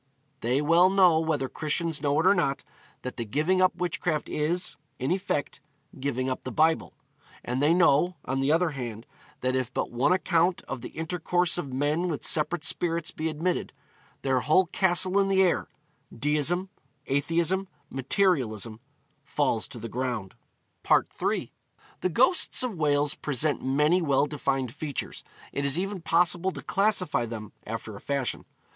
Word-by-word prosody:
They 125 +4 +1
well 170 +4 +5
know, 185 -4 +5
whether 155 -4 0
Christians 155 +1 -1
know 145 -1 +1
it 165 - +1
or 195 - +7
not, 140 -8 0 0.4
that 125 - -6
the 120 - -2
giving 155 - +1
up 185 -1 +3
witchcraft 175 -3 -2
is, 170 +2 -1 0.2
in 130 +4 -2
effect, 185 -5 -2 0.4
giving 130 -1 -1
up 130 - -3
the 130 - -5
Bible. 160 +6 +1 0.5
And 125 +2 -1
they 150 +2 +4
know, 175 0 +4
on 135 +1 -1
the 135 +2 +2
other 165 +1 +2
hand, 120 -5 -6 0.4
that 130 0 0
if 130 -2 -1
but - - -2
one 125 +7 +2
account 180 -1 +2
of 135 -2 -6
the - - -7
intercourse 175 +2 0
of 140 -6 -5
men 145 +6 0
with 155 -5 -3
separate 155 +1 +2
spirits 170 -2 0
be 160 +1 -3
admitted, 165 +4 -2 0.5
their 130 -1 +2
whole 155 +8 +3
castle 185 +2 +2
in 195 - +3
the 190 0 +4
air 180 - +1 0.4
deism, 150 +8 0 0.4
atheism, 170 +7 0 0.2
materialism 130 - 0 0.4
falls 140 -5 0
to - - -10
the 115 0 -6
ground.' 120 -6 -3 0.5
III. - - +1 0.5
The 185 - 0
ghosts 260 - +2
of 250 -3 -2
Wales 145 -3 +1
present 150 0 -1
many 150 +7 +3
well 140 -3 +2
defined 135 -4 -2
features. 145 -3 -5 0.3
It 140 - -2
is 140 +2 +1
even 195 0 -3
possible 175 +2 +2
to - - -8
classify 195 - +1
them, 110 -2 -7 0.2
after 110 -1 -5
a 100 - -10
fashion. 140 -3 -2
150 Hz, 160 wpm, -27 LUFS, 135-175 Hz, 0.5 s, or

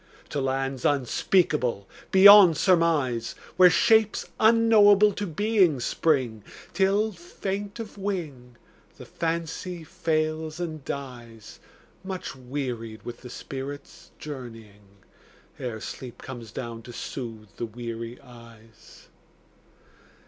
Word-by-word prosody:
To 145 - -2
lands 135 0 -2
unspeakable 135 - +1 0.2
beyond 190 -4 +9
surmise, 160 - +2 0.2
Where 185 -1 +8
shapes 220 +4 +3
unknowable 215 -2 +6
to 205 +1 -4
being 185 - +2
spring, 125 -5 0 0.3
Till, 200 +3 +2
faint 195 +3 -6
of 215 -2 -8
wing, 155 -12 -5 0.4
the - - -11
Fancy 170 +1 -4
fails 155 -2 -2
and 160 -4 -5
dies 120 -6 -8 0.4
Much 190 -6 -6
wearied 125 -4 -5
with 120 -1 -8
the 125 - -10
spirit's 135 +3 -8
journeying, 110 -8 -11 0.6
Ere 120 -4 -4
sleep 120 +2 -9
comes 120 -5 -9
down 115 -1 -6
to 120 - -11
soothe 115 -5 -7
the 120 - -3
weary 115 +1 -7
eyes. 115 -4 -17
140 Hz, 105 wpm, -26 LUFS, 120-185 Hz, 0.6 s, beyond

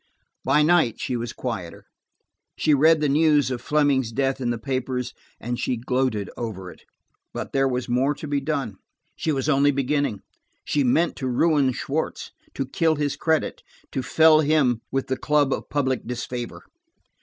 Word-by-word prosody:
By 150 - +3
night 155 -8 +3
she 125 - -2
was 120 0 -3
quieter. 100 -10 -6 0.7
She 155 - +2
read 155 +2 +5
the 150 - +2
news 145 -1 +3
of 125 - -3
Fleming's 140 -5 +1
death 135 +2 -1
in 120 - -1
the 120 - -1
papers, 130 0 -3 0.3
and 120 +1 -4
she 125 - -1
gloated 125 -3 -1
over 95 -6 -6
it. - - -17 0.5
But - - -5
there 135 0 +3
was 125 -1 -2
more 130 +4 +1
to 155 - -8
be 145 -1 -1
done; 135 -9 -3 0.4
she 160 - -1
was 135 -1 -1
only 140 -1 +4
beginning. 140 -5 -1 0.4
She 145 - +1
meant 145 +7 +2
to 130 - -3
ruin 140 +1 +2
Schwartz, 145 +5 -3 0.2
to 135 - -2
kill 160 +4 +1
his 145 -1 -1
credit, 160 -1 0 0.3
to 130 - -2
fell 155 +4 +5
him 145 -6 +2
with 135 0 -1
the 130 - -2
club 145 -1 +2
of - - -5
public 130 -4 -1
disfavor. 120 0 -5
135 Hz, 170 wpm, -24 LUFS, 125-150 Hz, 0.7 s, read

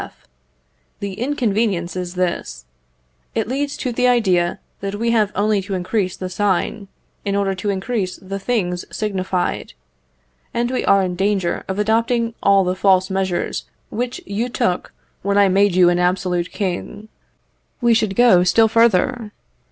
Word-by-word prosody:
F. - - -14 0.7
The 200 -1 -4
inconvenience 215 -7 -1
is 180 0 -4
this, 170 - -2 0.7
it - - 0
leads 280 +3 -2
to 255 - -2
the 250 +1 +2
idea 185 -8 +2 0.2
that 200 0 -4
we 230 +2 0
have 215 -3 +2
only 205 0 +2
to 195 0 -4
increase 185 +1 -1
the 185 - -4
sign, 200 +2 -1 0.4
in 200 0 -1
order 200 -1 +1
to 190 +2 -3
increase 195 -1 -2
the 195 +1 -6
things 190 -5 -1
signified; 190 -3 -2 0.8
and 240 +1 0
we 260 - -1
are 195 -1 +4
in 180 -1 -2
danger 195 -2 0
of 190 - -3
adopting 230 +2 +1
all 195 -1 +4
the 180 0 0
false 190 0 +3
measures 190 -2 -1 0.3
which 245 +2 -3
you 220 +5 -2
took 180 -6 -1 0.3
when 200 +1 0
I 200 -1 +5
made 195 0 +3
you 180 -1 +6
an 175 0 +1
absolute 180 -1 0
king. 205 +2 -4 0.7
We 240 -3 +4
should 215 -3 +1
go 225 -7 +6
still 220 +5 +4
further. 230 +1 +2
200 Hz, 155 wpm, -20 LUFS, 185-225 Hz, 0.8 s, you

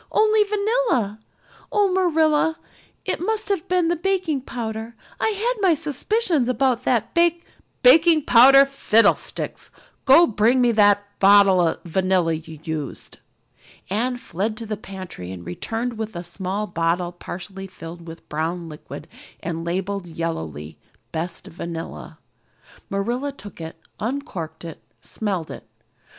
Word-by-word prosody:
"Only 430 0 +4
vanilla. 415 - 0 0.5
Oh, 405 -3 +2
Marilla, 320 -3 +2 0.5
it - - -2
must 435 +3 -1
have 385 -2 -1
been 360 -2 +2
the 345 - +2
baking 355 -5 -1
powder. 225 -2 -5 0.2
I - - +1
had 440 +2 -1
my 365 -4 +4
suspicions 305 - 0
of 255 - -1
that 250 -3 +1
bak 340 0 +2 0.2
" - - -44
"Baking 310 +4 +6
powder 270 +3 +8
fiddlesticks! 250 -5 +1 0.4
Go 275 +6 +8
and 230 -11 0
bring 230 +5 +4
me 245 -1 +4
the 205 -2 +5 0.2
bottle 195 -2 +6
of 165 -2 0
vanilla 185 -1 +1
you 160 0 -7
used." 155 -4 -6 0.7
Anne 245 +5 0
fled 215 -1 -3
to 230 - -6
the 215 0 -3
pantry 185 - -8
and 90 -2 -9
returned 225 - -4
with 220 -2 -4
a 170 - -5
small 190 +4 -3
bottle 175 -1 -1
partially 190 +2 -8
filled 170 -2 -10
with 165 0 -9
a - - -39
brown 165 +3 -3
liquid 150 -1 -10 0.4
and 165 -1 -3
labeled 185 +2 -3
yellowly, 80 - -5 0.3
"Best 165 +1 -4
Vanilla." 165 - -7 0.7
Marilla 240 +8 -2
took 205 -10 -11
it, 160 0 -7 0.2
uncorked 220 - -5
it, 165 - -9 0.2
smelled 190 -7 -3
it. - - -10
215 Hz, 140 wpm, -22 LUFS, -, 0.7 s, powder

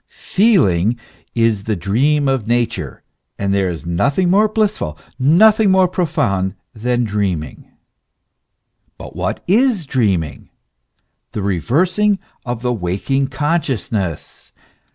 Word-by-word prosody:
Feeling 120 - +3 0.4
is 115 -3 +1
the 110 - 0
dream 135 - +1
of 135 -5 0
Nature; 120 0 -2 0.3
and 100 -1 -1
there 95 -2 +1
is 85 -1 -6
nothing 140 - +1
more 210 +3 +4
blissful, 210 - -1 0.2
nothing 205 - +5
more 190 -1 +4
profound 100 - -1 0.2
than 120 +2 -1
dreaming. 100 -7 -3 1.3
But - - -10
what - - -3
is 215 - +2
dreaming? 100 - -1 0.8
The 105 - -3
reversing 175 - +1 0.3
of 120 -1 -4
the 125 0 0
waking 110 +8 -1
consciousness. 135 - -3
120 Hz, 110 wpm, -18 LUFS, -, 1.3 s, nothing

